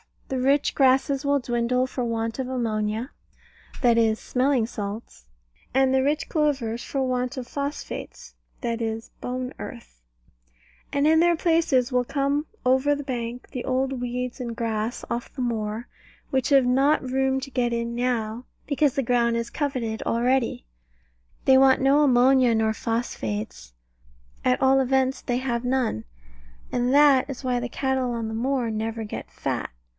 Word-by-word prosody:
The 265 Hz, -, -1 dB
rich 275 Hz, +3 st, +2 dB
grasses 270 Hz, +1 st, +3 dB
will 285 Hz, 0 st, +3 dB
dwindle 245 Hz, +1 st, 0 dB
for 255 Hz, -1 st, -3 dB
want 225 Hz, +1 st, -2 dB
of 260 Hz, -, -2 dB
ammonia 225 Hz, -1 st, -2 dB, 0.7 s
(that 235 Hz, -2 st, +4 dB
is 220 Hz, -1 st, +3 dB
smelling 255 Hz, -1 st, +1 dB
salts), 205 Hz, -, -7 dB, 0.5 s
and 265 Hz, 0 st, +3 dB
the 265 Hz, -, +4 dB
rich 290 Hz, +3 st, 0 dB
clovers 270 Hz, -7 st, 0 dB
for 270 Hz, -1 st, -2 dB
want 255 Hz, 0 st, -1 dB
of 255 Hz, -2 st, -5 dB
phosphates 285 Hz, +1 st, -6 dB, 0.3 s
(that 235 Hz, -1 st, -2 dB
is 225 Hz, 0 st, -4 dB
bone 250 Hz, 0 st, -4 dB
earth): -, -, -9 dB, 0.9 s
and 280 Hz, +1 st, +2 dB
in 320 Hz, +1 st, +5 dB
their 345 Hz, 0 st, +4 dB
places 320 Hz, -7 st, +2 dB
will 250 Hz, 0 st, +1 dB
come 280 Hz, +3 st, 0 dB, 0.2 s
over 265 Hz, +3 st, +3 dB
the 285 Hz, -, -5 dB
bank 245 Hz, -2 st, -5 dB
the 250 Hz, -, -5 dB
old 260 Hz, 0 st, 0 dB
weeds 250 Hz, +1 st, -3 dB
and 235 Hz, -2 st, -4 dB
grass 225 Hz, 0 st, -2 dB
off 235 Hz, 0 st, -3 dB
the 265 Hz, -, -5 dB
moor, 225 Hz, -1 st, -2 dB, 0.4 s
which 265 Hz, -2 st, 0 dB
have 275 Hz, -3 st, +5 dB
not 270 Hz, +4 st, +3 dB
room 265 Hz, +1 st, 0 dB
to 275 Hz, +1 st, -7 dB
get 245 Hz, -2 st, 0 dB
in 235 Hz, 0 st, -2 dB
now, 240 Hz, -1 st, -2 dB, 0.2 s
because 285 Hz, -2 st, +1 dB
the 275 Hz, -, +1 dB
ground 235 Hz, -1 st, +2 dB
is 235 Hz, 0 st, -2 dB
coveted 250 Hz, -7 st, -2 dB
already. 240 Hz, -, 0 dB, 0.8 s
They 265 Hz, -1 st, +6 dB
want 265 Hz, 0 st, +5 dB
no 275 Hz, +3 st, +4 dB
ammonia 255 Hz, -2 st, +4 dB
nor 220 Hz, 0 st, +2 dB
phosphates 105 Hz, -, -4 dB, 0.7 s
at 125 Hz, -, +2 dB
all 265 Hz, 0 st, +5 dB
events 265 Hz, 0 st, +1 dB
they 245 Hz, -2 st, -1 dB
have 250 Hz, -2 st, -2 dB
none, 245 Hz, -, 0 dB, 0.7 s
and 245 Hz, 0 st, +1 dB
that 285 Hz, -2 st, +5 dB
is 275 Hz, 0 st, -6 dB
why 250 Hz, -1 st, 0 dB
the 245 Hz, 0 st, -4 dB
cattle 260 Hz, -1 st, -1 dB
on 230 Hz, -1 st, -3 dB
the -, -, -5 dB
moor 245 Hz, 0 st, 0 dB
never 225 Hz, +1 st, -3 dB
get 210 Hz, -, -7 dB
fat. -, -, -3 dB
250 Hz, 160 wpm, -25 LUFS, 230-270 Hz, 0.9 s, They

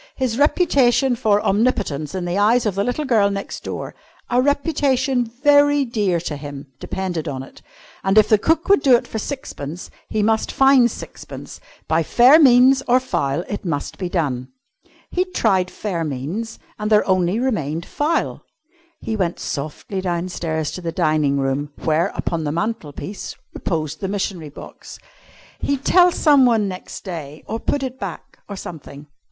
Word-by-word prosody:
His 255 Hz, -2 st, -1 dB
reputation 275 Hz, -5 st, +3 dB
for 210 Hz, -3 st, +2 dB
omnipotence 195 Hz, -, 0 dB
in 180 Hz, -2 st, -3 dB
the 175 Hz, 0 st, -2 dB
eyes 230 Hz, +4 st, +3 dB
of 210 Hz, -, +1 dB
the 200 Hz, +2 st, 0 dB
little 245 Hz, +7 st, -2 dB
girl 220 Hz, -6 st, +3 dB
next 200 Hz, 0 st, -5 dB
door -, -, -5 dB, 0.4 s
a 245 Hz, +1 st, +4 dB
reputation 275 Hz, -3 st, +1 dB
very 285 Hz, +4 st, +3 dB
dear 205 Hz, -7 st, 0 dB
to 155 Hz, -4 st, -4 dB
him 145 Hz, 0 st, -8 dB
depended 180 Hz, -4 st, -4 dB
on 135 Hz, -2 st, -4 dB
it. -, -, -15 dB, 0.4 s
And 195 Hz, +2 st, +2 dB
if 215 Hz, 0 st, +6 dB
cook 325 Hz, +1 st, +1 dB
would 400 Hz, 0 st, +5 dB
do 260 Hz, -3 st, +6 dB
it 235 Hz, -, 0 dB
for 220 Hz, -, -5 dB
sixpence, 180 Hz, -, -6 dB, 0.2 s
he 215 Hz, -1 st, 0 dB
must 220 Hz, +1 st, +1 dB
find 270 Hz, -3 st, +5 dB
sixpence. -, -, -9 dB, 0.3 s
By 160 Hz, +1 st, +2 dB
fair 250 Hz, -, +6 dB
means 260 Hz, -1 st, +6 dB
or 250 Hz, +1 st, +5 dB
foul 145 Hz, -, -1 dB
it 205 Hz, -, -5 dB
must 155 Hz, -6 st, -4 dB
be 180 Hz, -2 st, -3 dB
done. 135 Hz, -8 st, -1 dB, 0.6 s
He'd 365 Hz, +1 st, -2 dB
tried 190 Hz, -5 st, +2 dB
fair 185 Hz, -6 st, -3 dB
means, 160 Hz, -, -4 dB, 0.2 s
and 210 Hz, +1 st, -2 dB
there 210 Hz, -1 st, +4 dB
only 185 Hz, +1 st, +2 dB
remained 170 Hz, -, -1 dB
foul. 310 Hz, +3 st, -1 dB, 0.6 s
He 220 Hz, -, -3 dB
went 180 Hz, -5 st, -1 dB
softly 155 Hz, +7 st, -4 dB
downstairs 170 Hz, -3 st, -2 dB
to 180 Hz, -, -7 dB
the 170 Hz, -1 st, -3 dB
dining 155 Hz, -3 st, +1 dB
room, 140 Hz, +2 st, -2 dB
where, 160 Hz, +1 st, +1 dB
upon 165 Hz, -2 st, -2 dB
the 145 Hz, -, -1 dB
mantel 170 Hz, -2 st, -3 dB
piece, 195 Hz, +7 st, -7 dB, 0.2 s
reposed 155 Hz, -3 st, -3 dB
the 195 Hz, -, -2 dB
missionary 190 Hz, -5 st, -3 dB
box. 140 Hz, -, -11 dB, 0.6 s
He'd 280 Hz, -1 st, -2 dB
tell 360 Hz, -1 st, +6 dB
someone 255 Hz, -10 st, +4 dB
next 185 Hz, -1 st, -7 dB
day, 160 Hz, -5 st, -7 dB
or 225 Hz, -, -4 dB
put 280 Hz, +4 st, -1 dB
it 260 Hz, 0 st, -5 dB
back, -, -, -7 dB
or 200 Hz, -, -5 dB
something. 150 Hz, -5 st, -9 dB
205 Hz, 165 wpm, -21 LUFS, 160-255 Hz, 0.6 s, if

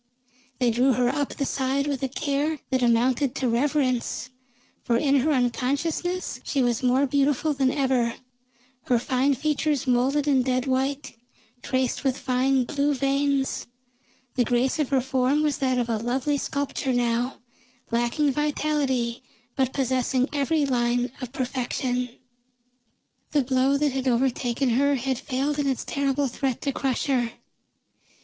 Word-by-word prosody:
They 245 Hz, -3 st, +2 dB
drew 255 Hz, +3 st, +3 dB
her 245 Hz, 0 st, +2 dB
up 285 Hz, +1 st, -2 dB
the 275 Hz, -, -1 dB
side 270 Hz, +1 st, 0 dB
with 280 Hz, -2 st, -2 dB
a 270 Hz, -, 0 dB
care 290 Hz, +3 st, -1 dB
that 260 Hz, -1 st, +1 dB
amounted 245 Hz, +2 st, +2 dB
to 260 Hz, -, -1 dB
reverence, 255 Hz, -1 st, 0 dB, 0.5 s
for 235 Hz, -, +1 dB
in 280 Hz, +2 st, +3 dB
her 305 Hz, +5 st, +1 dB
unconsciousness 285 Hz, +8 st, -1 dB
she 275 Hz, -3 st, 0 dB
was 240 Hz, -2 st, +1 dB
more 255 Hz, +2 st, +3 dB
beautiful 285 Hz, +2 st, +1 dB
than 270 Hz, -2 st, +2 dB
ever, 260 Hz, -4 st, +1 dB, 0.7 s
her 245 Hz, -, +3 dB
fine 260 Hz, +3 st, +1 dB
features 300 Hz, 0 st, 0 dB
molded 265 Hz, +4 st, +2 dB
in 270 Hz, -3 st, +4 dB
dead 255 Hz, 0 st, 0 dB
white, 270 Hz, +2 st, -1 dB, 0.5 s
traced 260 Hz, 0 st, -1 dB
with 265 Hz, -1 st, +1 dB
fine 260 Hz, 0 st, +1 dB
blue 285 Hz, +2 st, 0 dB
veins; 275 Hz, 0 st, 0 dB, 0.7 s
the 250 Hz, -, +2 dB
grace 245 Hz, +4 st, +1 dB
of 295 Hz, -, 0 dB
her 270 Hz, -2 st, +2 dB
form 265 Hz, +3 st, +1 dB
was 295 Hz, -3 st, 0 dB
that 255 Hz, -2 st, +1 dB
of 240 Hz, -1 st, 0 dB
a 230 Hz, -2 st, 0 dB
lovely 260 Hz, +5 st, -1 dB
sculpture 280 Hz, -1 st, -2 dB
now, 240 Hz, +1 st, 0 dB, 0.5 s
lacking 240 Hz, +5 st, +1 dB
vitality, 280 Hz, -4 st, 0 dB, 0.3 s
but 260 Hz, -1 st, +1 dB
possessing 260 Hz, -1 st, 0 dB
every 290 Hz, +1 st, +1 dB
line 245 Hz, -1 st, 0 dB
of 250 Hz, -2 st, -5 dB
perfection. 250 Hz, -1 st, -2 dB, 1.2 s
The 290 Hz, -2 st, +3 dB
blow 260 Hz, +2 st, +2 dB
that 295 Hz, 0 st, +1 dB
had 265 Hz, 0 st, -2 dB
overtaken 250 Hz, +1 st, +1 dB
her 280 Hz, +4 st, +3 dB
had 260 Hz, -1 st, -2 dB
failed 280 Hz, +3 st, -2 dB
in 285 Hz, -, 0 dB
its 265 Hz, -2 st, -1 dB
terrible 280 Hz, 0 st, 0 dB
threat 260 Hz, 0 st, -2 dB
to 280 Hz, -, -1 dB
crush 265 Hz, -1 st, -1 dB
her. 245 Hz, -4 st, 0 dB
265 Hz, 150 wpm, -25 LUFS, 250-280 Hz, 1.2 s, in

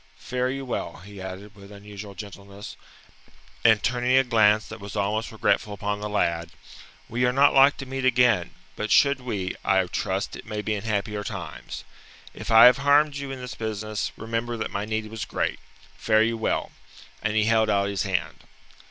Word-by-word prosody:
Fare 125 Hz, 0 st, -2 dB
you 135 Hz, +1 st, -4 dB
well," 125 Hz, -, -4 dB
he 100 Hz, -1 st, -10 dB
added 95 Hz, +2 st, -8 dB
with 100 Hz, 0 st, -14 dB
unusual 100 Hz, 0 st, -10 dB
gentleness, 100 Hz, 0 st, -10 dB, 0.9 s
and 110 Hz, -3 st, +5 dB
turning 125 Hz, +1 st, +2 dB
a 135 Hz, -, +6 dB
glance 110 Hz, -3 st, +3 dB
that 110 Hz, -, -9 dB
was 100 Hz, 0 st, -8 dB
almost 105 Hz, +3 st, -1 dB
regretful 110 Hz, -1 st, 0 dB
upon 105 Hz, 0 st, -3 dB
the 105 Hz, -, -3 dB
lad. 85 Hz, -5 st, 0 dB, 0.6 s
"We 120 Hz, +2 st, -1 dB
are 125 Hz, -, +3 dB
not 140 Hz, +2 st, +4 dB
like 135 Hz, +1 st, +6 dB
to 135 Hz, -, -6 dB
meet 135 Hz, 0 st, -4 dB
again, 125 Hz, -8 st, +3 dB, 0.3 s
but 105 Hz, -, -3 dB
should 140 Hz, +2 st, +4 dB
we, 100 Hz, -7 st, -3 dB
I 95 Hz, -1 st, +3 dB
trust 95 Hz, +2 st, -3 dB
it -, -, -11 dB
may 105 Hz, -1 st, -4 dB
be 110 Hz, -, -1 dB
in 105 Hz, 0 st, -4 dB
happier 105 Hz, -1 st, -2 dB
times. 95 Hz, -6 st, -7 dB, 0.5 s
If -, -, -8 dB
I 115 Hz, +1 st, +9 dB
have 125 Hz, +1 st, +7 dB
harmed 145 Hz, +1 st, +3 dB
you 140 Hz, -1 st, -5 dB
in 135 Hz, -1 st, -6 dB
this 125 Hz, -1 st, -6 dB
business, 110 Hz, -1 st, -3 dB
remember 115 Hz, +1 st, -3 dB
that 110 Hz, -, -4 dB
my 100 Hz, +1 st, -3 dB
need 110 Hz, 0 st, -2 dB
was 110 Hz, 0 st, -6 dB
great. -, -, -2 dB, 0.4 s
Fare 110 Hz, -1 st, +3 dB
you 115 Hz, +1 st, 0 dB
well." 110 Hz, -, -1 dB, 0.5 s
And 105 Hz, 0 st, -1 dB
he 110 Hz, -, +3 dB
held 110 Hz, 0 st, +3 dB
out 100 Hz, -1 st, +2 dB
his 100 Hz, -2 st, -2 dB
hand. 95 Hz, -3 st, -2 dB
110 Hz, 190 wpm, -25 LUFS, 100-125 Hz, 0.9 s, I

